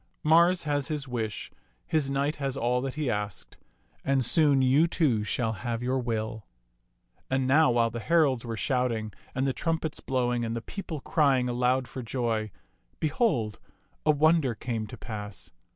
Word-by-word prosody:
Mars 170 +3 +5
has 145 -2 -1
his 150 -3 -3
wish, 115 -4 -4 0.3
his 150 -4 0
knight 140 +2 0
has 135 -2 -2
all 125 +1 +1
that 135 0 -4
he 155 -2 -2
asked; 105 -3 -4 0.5
and 135 -2 +2
soon 145 -1 +4
you, 140 +6 +4
too, 140 -11 +1
shall 110 +1 -1
have 115 +3 -4
your 130 +1 0
will." 110 -2 -3 0.8
And 130 0 +1
now 140 +2 +5
while 120 -1 +2
the 115 - -4
heralds 145 -3 +2
were 115 -2 -5
shouting 120 -5 -1 0.2
and 130 +1 0
the 135 - +1
trumpets 165 0 -2
blowing 125 -2 0
and 115 0 -2
the - - -1
people 170 -7 -6
crying 140 -8 +2
aloud 125 +1 +1
for 130 - -6
joy, 115 -3 -1 0.5
behold, 140 - 0 0.4
a - - 0
wonder 155 -4 +3
came 115 -2 -3
to 120 - -9
pass. 105 -5 -7
130 Hz, 165 wpm, -28 LUFS, 115-145 Hz, 0.8 s, Mars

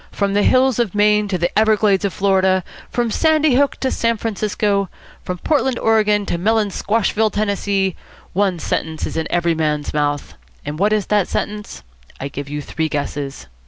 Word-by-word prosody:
From 200 -1 -1
the 205 - +3
hills 255 +1 +3
of 220 -5 0
Maine 210 0 +3
to 190 -2 -1
the 175 +1 -1
Everglades 215 -2 +3
of 200 - 0
Florida, 190 0 +2 0.3
from 240 -2 -1
Sandy 310 +1 +3
Hook 280 +2 +2
to 260 - 0
San 230 0 0
Francisco, 205 -2 -1 0.3
from 180 - -4
Portland, 265 - 0
Oregon, 210 -2 +2
to 170 - -2
Melonsquashville, 220 +1 +1
Tennessee, 200 -2 0 0.4
one 195 -1 +1
sentence 160 -1 -2
is - - -6
in 160 0 -1
every 170 -1 +1
man's 150 -2 -1
mouth. 145 -1 -1 0.3
And 150 +2 -5
what 205 +2 +3
is 215 -2 +1
that 210 -3 +1
sentence? 210 - -4 0.4
I 135 - -4
give 140 0 -7
you 150 0 -4
three 160 +2 -2
guesses. 145 - -4
200 Hz, 170 wpm, -19 LUFS, 170-215 Hz, 0.4 s, the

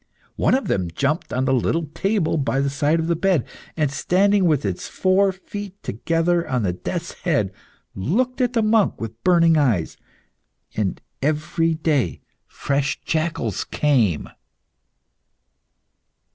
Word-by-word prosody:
One - - +3
of 270 - -1
them 90 -3 0
jumped 140 - -1
on 130 +1 0
the 135 - +2
little 160 +6 +1
table 195 -5 0
by 135 -2 0
the 140 0 0
side 145 +3 +1
of 160 - -1
the 170 0 +1
bed, 175 -5 +1 0.3
and 150 -4 +1
standing 195 +6 +2
with 150 -9 +2
its 95 -3 -3
four 190 +1 +2
feet 195 +1 -8
together 165 - 0
on 125 -3 0
the 90 -3 0
death's 170 - -4
head, 140 - 0 0.4
looked 245 - -1
at 245 0 +1
the 230 -3 +2
monk 215 -1 +2
with 115 0 -7
burning 170 -3 +5
eyes. 115 - +1 0.8
And 100 -4 -1 0.2
every 155 +3 0
day 145 - 0 0.3
fresh 140 0 -1
jackals 155 - -1
came. 120 - +1
155 Hz, 140 wpm, -22 LUFS, 130-180 Hz, 0.8 s, burning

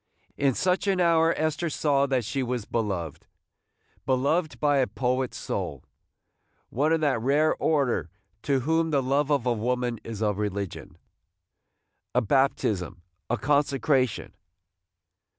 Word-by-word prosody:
In 135 -3 +1
such 185 +2 0
an 195 -2 +2
hour 165 -2 +4
Esther 155 +2 -1
saw 140 -2 +1
that 130 -4 0
she 135 +6 -2
was 125 -3 -2
beloved! 95 -9 -3 0.4
– - - -40
beloved 145 +5 +1
by 145 -1 +2
a 130 - +2
poet 125 +4 -1
soul, - - -4 0.4
– - - -51 0.3
one 145 +6 +1
of 165 -1 +2
that 140 -7 +1
rare 145 +5 +3
order 135 - +1 0.3
to 135 -2 +1
whom 160 +4 +1
the 140 -3 +1
love 140 +3 +1
of 140 -5 +1
woman 120 0 -1
is 110 -1 -5
a 105 -1 +2
religion! 100 -2 -4 0.6
– - - -52
a 125 - +4
baptism! 105 -7 0
– 80 -3 -51
a - - +1
consecration! 135 -3 +1
135 Hz, 145 wpm, -26 LUFS, 115-150 Hz, 0.6 s, hour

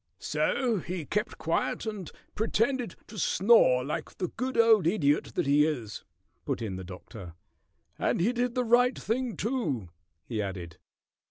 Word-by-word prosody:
"So 245 -5 0
he 175 -2 -5
kept 210 +8 -2
quiet 165 +7 -1
and 210 -6 -5 0.2
pretended 230 +3 0
to 215 -2 -9
snore 175 - +4
like 150 - -5
the 180 - -2
good 255 +2 -3
old 225 -6 +5
Idiot 150 -6 +1
that - - +1
he 145 +2 +4
is," 125 -9 -3 0.4
put - - -2
in 105 -5 -4
the 95 - -6
Doctor. 90 -1 -10 0.6
"And - - +1
he 215 +8 +2
did 245 0 -1
the 250 - +1
right 245 +2 +4
thing, 240 +1 -2
too," 160 - -2 0.4
he 110 -3 -2
added. 90 -5 -6
185 Hz, 155 wpm, -29 LUFS, -, 0.6 s, old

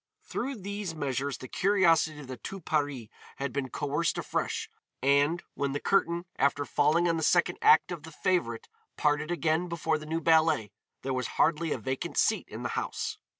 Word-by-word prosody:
Through 270 +3 -3
these 200 -4 -5
measures 140 -2 -2
the 130 - -9
curiosity 165 -4 +3
of - - -9
the 130 0 -6
Tout 195 +7 -8
Paris 145 -7 -1 0.3
had 140 -2 -4
been 140 -2 -2
coerced 150 +6 -1
afresh, - - -2 0.4
and, 145 +5 +3
when 140 -1 -2
the 145 - -1
curtain, 170 -1 +1
after 140 +1 +2
falling 155 +5 +2
on 165 -1 +1
the - - -2
second 175 +2 +2
act 155 +3 +5
of 170 -3 -5
the 160 +2 -11
"Favorite" 150 -8 -1 0.3
parted 150 +1 +1
again 170 0 +1
before 160 -2 0
the 155 - -10
new 165 +1 -1
ballet, 160 - +3 0.3
there 135 - -1
was 125 -2 -1
hardly 165 0 +2
a - - 0
vacant 130 0 -4
seat - - +2
in - - -7
the - - -2
house. - - -3
155 Hz, 185 wpm, -29 LUFS, 140-170 Hz, 0.4 s, act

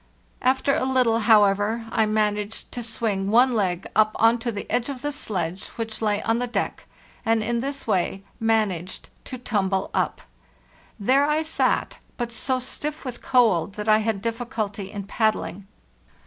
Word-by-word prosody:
After 265 +2 +2
a - - +1
little, 255 -3 +3
however, 210 0 +3
I 220 -2 +2
managed 210 0 -1
to 245 - -4
swing 220 -4 -1
one 245 +4 +5
leg 190 -5 0
up 215 0 +4
on 225 +1 +4
to 235 +1 -2
the 205 -2 -5
edge 245 +2 0
of 270 -2 -6
the 290 - -1
sledge 190 - -3
which 225 -1 -5
lay 210 -2 +1
on 225 +1 +1
the 245 - -1
deck, 240 - -3 0.4
and 225 -1 +2
in 235 +2 0
this 275 +3 -4
way 195 -2 0 0.2
managed 210 -6 0 0.2
to 255 - -6
tumble 195 -5 -1
up. - - 0 0.8
There 265 +7 +3
I 310 +1 +2
sat, 315 - 0 0.2
but 240 -1 -3
so 255 +3 0
stiff 290 +4 -5
with 250 -2 -6
cold 215 -8 +3
that 210 +1 -6
I 215 0 +6
had 215 -2 -1
difficulty 225 -4 -3
in 200 0 -6
paddling. 205 -2 -1
225 Hz, 165 wpm, -24 LUFS, 205-245 Hz, 0.8 s, I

